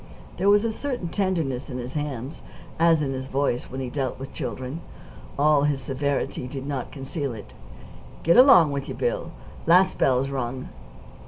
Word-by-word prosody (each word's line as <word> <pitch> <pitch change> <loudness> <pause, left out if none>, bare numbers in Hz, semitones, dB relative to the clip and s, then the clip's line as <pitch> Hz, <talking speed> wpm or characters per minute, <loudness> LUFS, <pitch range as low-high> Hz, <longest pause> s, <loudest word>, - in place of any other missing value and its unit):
There 195 +3 +2
was 205 +1 +5
a 230 - 0
certain 245 -7 -4
tenderness 165 -10 -1
in 125 - -5
his 125 +1 -6
hands, 145 -1 -4 0.4
as 165 -2 +4
in 135 -1 -2
his 130 0 -5
voice, 135 -2 0
when 130 +1 -5
he 125 -2 -4
dealt 135 -2 -2
with 135 +1 -8
children. 130 +6 -5 0.6
All 145 0 +4
his 145 -2 +1
severity 135 -1 -2
did 135 +1 -6
not 140 -4 -4
conceal 135 -1 -4
it. 105 - -11 0.7
"Get 170 - +4
along 245 - +8
with 140 -1 -4
you, - - -4
Bill. - - -1 0.4
Last 180 +3 +5
bell's 130 +1 +2
rung." 130 -1 -4
140 Hz, 170 wpm, -25 LUFS, 130-165 Hz, 0.7 s, along